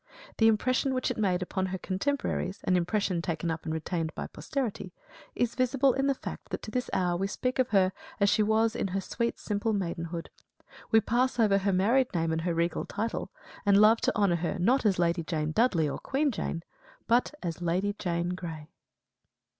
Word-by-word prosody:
The 225 - +5
impression 255 +4 +2
which 255 - 0
it - - -4
made 185 -3 +1
upon 190 +1 -2
her 190 0 -3
contemporaries, 195 -1 -2
an 185 - +2
impression 180 0 0
taken 170 0 -2
up 160 0 -5
and 155 - -2
retained 160 0 -2
by - - -4
posterity, 230 -9 -4 0.4
is 240 -1 0
visible 255 +1 +2
in 270 +1 0
the 275 - +2
fact - - -6
to 215 - -8
this 250 +1 -2
hour 180 -2 +1
we 195 +3 -1
speak 255 +6 -2
of 255 -1 +2
her 190 -4 +4 0.3
as 200 - +4
she 215 +2 +3
was 220 +1 +2
in - - -1
her 195 +1 -2
sweet 235 +4 -2
simple 210 +1 -1
maidenhood 170 -3 -3 0.6
we 220 -1 +5
pass 245 +3 +1
over 205 -3 +4
her 200 +1 +1
married 230 +8 +3
name 165 -1 +1
and 160 0 0
her 170 0 -1
regal 170 0 0
title, 225 +2 -3 0.3
and 200 -1 +5
love 215 +2 +6
to - - +1
honour 200 -5 +3
her, 175 +4 -2
not 235 +7 +3
as 195 - +2
Lady 170 0 +1
Jane 155 -2 -2
Dudley, 175 -6 +2
or 140 - -4
Queen 280 +2 0
Jane, 170 -6 -3 0.4
but 240 +5 +2
as 170 0 -4
Lady 185 +4 0
Jane 170 -1 -1
Grey. 165 -4 -6
195 Hz, 195 wpm, -29 LUFS, 175-230 Hz, 0.6 s, love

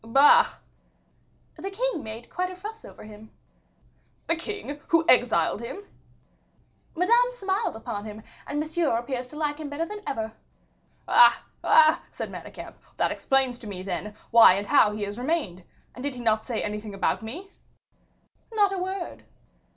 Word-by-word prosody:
"Bah!" 270 +6 +6 1.0
"The 390 - -5
king 425 -4 -2
made 220 +2 -8
quite 365 0 -2
a 370 - -8
fuss 425 +4 -9
over - - -12
him." 215 0 -12 1.0
"The 335 - +1
king, 330 -5 -6
who 330 -1 +3
exiled 225 - +3
him!" 380 +12 -7 1.1
"Madame 470 +8 +3
smiled 400 - -2
upon 210 -2 -6
him, 215 0 -9 0.2
and 290 - -2
Monsieur 315 -4 0
appears 250 +1 -4
to 300 - -14
like 300 -1 -2
him 305 -2 -5
better 295 +3 -2
than 420 +4 -8
ever." 220 -3 -3 0.8
"Ah! 485 - +6 0.2
ah!" 315 0 +5
said - - -6
Manicamp, - - -9 0.2
"that - - +1
explains 265 -2 +1
to 225 - -10
me, 185 -3 -6
then, 200 +2 -5 0.2
why 230 -5 +9
and 200 +1 -3
how 210 +1 +5
he 210 0 -4
has 205 +3 -5
remained. 250 - -2 0.3
And 250 - -10
did 285 -2 -3
he 245 - -7
not 220 -2 +1
say 235 -4 -2
anything 210 0 -5
about 195 - 0
me?" 340 - -8 1.0
"Not 415 -3 +3
a 385 - -2
word." 375 0 -4
275 Hz, 160 wpm, -26 LUFS, 220-360 Hz, 1.1 s, why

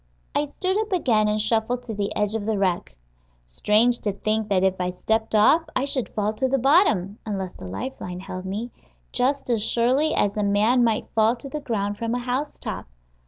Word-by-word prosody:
I 290 - +1
stood 370 +7 -1
up 435 0 -3
again 235 - +2
and 210 0 +1
shuffled 225 +3 +1
to 235 -2 -6
the 205 -1 -2
edge 210 0 0
of 220 -2 -3
the 220 -2 0
wreck. 175 - -1 0.5
Strange 215 - +2
to 205 - -1
think 215 +2 -1
that 190 -2 +2
if 190 -1 +1
I 180 - 0
stepped 220 +5 -1
off 215 +10 +5
I 260 - +1
should 265 -3 -2
fall 210 0 -1
to 260 - +1
the 270 +1 +1
bottom 245 - +3
(unless 195 -4 -4
the 95 - -10
life 95 - -6
line 180 0 -6
held 185 -1 -7
me) 215 +6 -4 0.4
just 270 +3 0
as 225 -3 +2
surely 255 +7 +2
as 205 0 +1
a 210 - +1
man 215 +5 +3
might 225 -2 +1
fall 225 +1 +3
to 250 +3 -9
the 300 - -4
ground 205 -7 -2
from 230 +1 -1
a - - 0
housetop. 255 +4 -4
220 Hz, 210 wpm, -24 LUFS, 200-250 Hz, 0.5 s, off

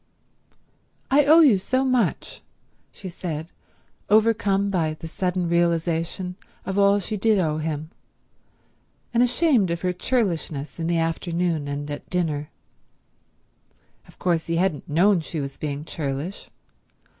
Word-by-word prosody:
"I 285 +1 +5
owe 315 +3 +7
you 250 -11 +6
so 260 +7 0
much," 255 -3 0 0.5
she 195 - -9
said, 165 -2 -5 0.6
overcome 205 -2 +3
by 160 -5 0
the 165 - -8
sudden 180 +1 -1
realization 170 +1 0 0.3
of 195 +1 -1
all 200 0 +5
she 205 +2 -3
did 215 +1 +3
owe 155 -4 0
him, 155 0 -4 1.2
and 235 - +3
ashamed 245 - +3
of 170 0 -2
her 180 -1 0
churlishness 170 - -2
in 165 - -1
the 170 0 +1
afternoon 165 -1 -1
and 145 +1 -4
at 145 - -7
dinner. 155 -5 -1 1.6
Of - - -19
course 170 -3 0
he 165 - 0
hadn't 175 -3 -1
known 180 +5 +4
she 160 0 -5
was 140 -1 -5
being 145 0 -4
churlish. 150 +4 -4
175 Hz, 135 wpm, -24 LUFS, 160-200 Hz, 1.6 s, owe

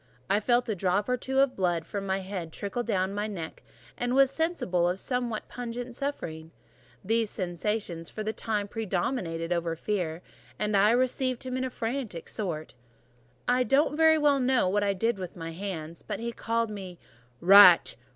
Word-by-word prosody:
I 205 - +4
felt 240 +3 +2
a 220 - 0
drop 195 +2 0
or 250 - +2
two 265 +2 +1
of 275 -2 +2
blood 175 -3 0
from 195 +2 -5
my 190 0 0
head 185 -4 -5
trickle 200 +7 -3
down 195 -5 -1
my 205 +1 -2
neck, 170 -6 -6 0.3
and 245 +1 -1
was 270 -1 +5
sensible 275 - 0
of 180 +2 -2
somewhat 245 -3 -2
pungent 245 0 -6
suffering: 160 - -4 0.6
these 225 +1 +1
sensations 180 -2 -3
for 215 - -5
the 215 +1 -2
time 210 -3 -2
predominated 180 -5 -2
over 170 -1 -1
fear, 175 -2 -3 0.3
and 210 0 0
I 200 +2 +5
received 255 +1 +1
him 255 -1 -4
in 260 0 -1
frantic 230 -7 -4
sort. 170 -8 -4 0.7
I 250 +1 +3
don't 275 +4 +2
very 320 0 +5
well 290 -2 +3
know 255 -5 +2
what 205 +3 +1
I 200 -1 +1
did 225 +2 0
with 185 -2 -6
my 165 -1 -6
hands, 165 -3 -6
but 210 - -5
he 235 +1 -3
called 230 -1 -1
me 190 -4 -7 0.4
"Rat! 185 -1 +8
210 Hz, 175 wpm, -28 LUFS, 180-245 Hz, 0.7 s, Rat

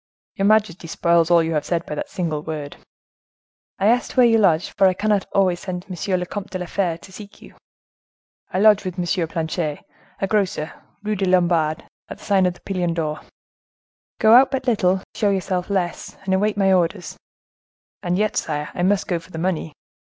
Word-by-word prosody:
"Your 195 - 0
majesty 210 -6 +2
spoils 170 0 +2
all 170 -1 +5
you 165 0 -2
have 150 -2 0
said 170 -1 -2
by - - -6
that 150 - -5
single 160 -5 -3
word." 150 -2 -6 1.0
"I 195 - -1
asked 240 +4 +1
where 250 - +7
you 225 -1 +4
lodged, 180 -3 +2
for 195 - +5
I 185 - +2
cannot 205 -1 0
always 185 -3 +2
send 180 -2 -5
to 190 - -14 0.2
M. 185 - +2
le 180 - -3
Comte 200 +2 -6
de 185 - -4
la 180 - -5
Fere 175 -2 -1
to 190 - -15
seek 205 +2 -12
you." - - -15 1.0
"I - - -2
lodge 210 0 +5
with 185 -1 -5
M. 175 -1 -1
Planchet, 160 -2 -3 0.3
a - - 0
grocer, 190 -6 -1 0.3
Rue 215 0 -1
des 195 -1 -1
Lombards, 170 -3 +2 0.3
at - - -7
the - - -15
sign 195 -3 +3
of 180 - -2
the - - -20
Pilon 180 -3 -2
d'Or." 155 -2 -2 1.0
"Go 220 0 +6
out 260 +2 +7
but 265 -1 -3
little, 190 -6 +1
show 205 - +1
yourself 185 -1 -1
less, 180 -4 -3
and 190 -1 -1
await 205 +2 +1
my 195 -1 +3
orders." 175 -2 0 0.9
"And 175 +1 -1
yet, 215 +1 0
sire, 150 -1 -2
I - - -4
must 195 +2 +1
go 175 -2 -1
for 165 - -18
the 165 - -8
money." 165 -2 -2
185 Hz, 205 wpm, -21 LUFS, 170-200 Hz, 1.0 s, where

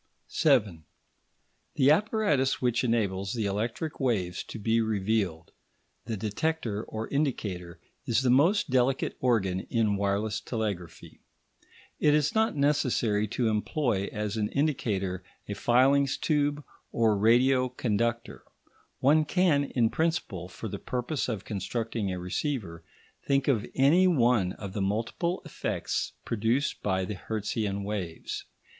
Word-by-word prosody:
§ - - -45 0.2
7 110 - +2 0.9
The 135 +1 +5
apparatus 160 - +2
which 120 -1 +1
enables 100 -5 0
the 115 -3 -1
electric 115 +10 -3
waves 100 - 0
to - - -8
be 115 +2 +1
revealed, 100 -6 -1 0.5
the 115 -2 -3
detector 110 - -2
or 110 +1 -5
indicator, 100 - -2 0.3
is 115 +2 +2
the 125 - +3
most 165 +6 +3
delicate 130 +1 +1
organ 100 -7 +1
in 110 -3 +1
wireless 100 +2 -1
telegraphy. 100 -8 -5 0.8
It 150 0 +4
is 150 -1 +1
not 220 -3 +2
necessary 125 -7 +1
to 115 +3 -1
employ 110 -1 0
as 105 0 -3
an 105 -1 0
indicator 100 - -1 0.2
a 100 - -3
filings 130 +6 +3
tube 145 -1 0 0.3
or 110 -2 +3
radio 125 +5 +4
conductor. 115 -1 -2 0.6
One 155 +4 +5
can, 155 -3 +2
in 120 -4 +1
principle, 160 - -1
for 95 - -7
the - - -5
purpose 125 +2 -2
of 110 -5 -4
constructing 110 0 -3
a 90 - -3
receiver, 90 - -3 0.4
think 140 -1 +2
of 120 -7 +1
any 160 +8 +5
one 120 - +3
of 100 -2 -8
the 100 - -2
multiple 115 - -1
effects - - -3
produced 115 +5 0
by 95 -2 0
the 105 - -4
Hertzian 105 0 -3
waves. 100 -5 -4
115 Hz, 130 wpm, -28 LUFS, 100-140 Hz, 0.9 s, The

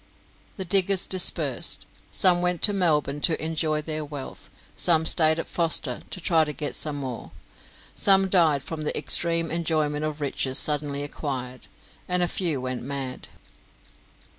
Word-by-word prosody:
The 190 - -6
diggers 195 +1 +3
dispersed; 185 -1 0 0.2
some 180 -3 +2
went 180 -1 -2
to 205 - +5
Melbourne 150 -6 0
to 165 - +1
enjoy 155 -1 -2
their 155 0 -3
wealth; 145 -2 -9 0.3
some 160 -2 +2
stayed 160 -1 +4
at - - -4
Foster 165 -6 -1
to - - -3
try 165 -2 +2
to 150 - -4
get 145 +2 -3 0.2
more; 135 -4 -7 0.6
some 195 -1 +4
died 160 -7 +2
from 160 -2 -6
the 150 - -2
extreme 165 -1 +1
enjoyment 155 -3 -1
of 155 0 -5
riches 135 -2 +1
suddenly 145 -1 +4
acquired, 130 -3 -7 0.4
and 180 0 +2
a - - +1
few 165 -5 -1
went 130 -1 -5
mad. 135 -1 -6
155 Hz, 145 wpm, -24 LUFS, 145-175 Hz, 0.6 s, to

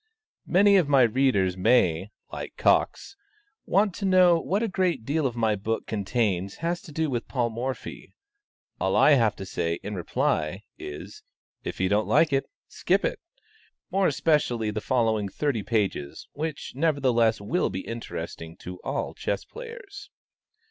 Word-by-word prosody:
Many 200 +2 +5
of 170 -6 +2
my 135 -3 +6
readers 110 -6 +2
may, 95 -3 +2 0.2
like - - -7
Cox, - - +1 0.5
want 200 -1 +3
to 195 - -4
know 180 -3 +5
what 195 +7 -1
a - - +1
great 180 - 0
deal 145 -1 0
my 110 -2 +1
book 110 +3 -3
contains 100 -3 -1
has 170 +2 -2
to 155 - -12
do 160 +1 -1
with 120 -4 -3
Paul 120 -3 -1
Morphy; 125 +4 -6 0.6
all - - +1
I - - +6
have 115 -7 +4
to 95 - -7
say, 85 -2 -2
in 105 - -5
reply, 90 0 -1 0.2
is, 380 +3 -8 0.4
if - - -5
you 95 - +2
don't 105 +3 +1
like 155 0 +3
it, 135 - 0 0.2
skip 190 +2 0
it; - - -2 0.7
more 195 +1 +3
especially 135 -8 +1
the 105 0 -3
following 110 -5 +1
thirty 140 -1 -1
pages, 100 -10 -2
which, 155 -1 -5
nevertheless, 130 -6 +2
will 155 - 0
be 95 - -4
interesting 85 -8 -7
to 90 0 -9
all - - -3
chess - - -3
players. 460 -4 -10
125 Hz, 155 wpm, -26 LUFS, 105-165 Hz, 0.7 s, my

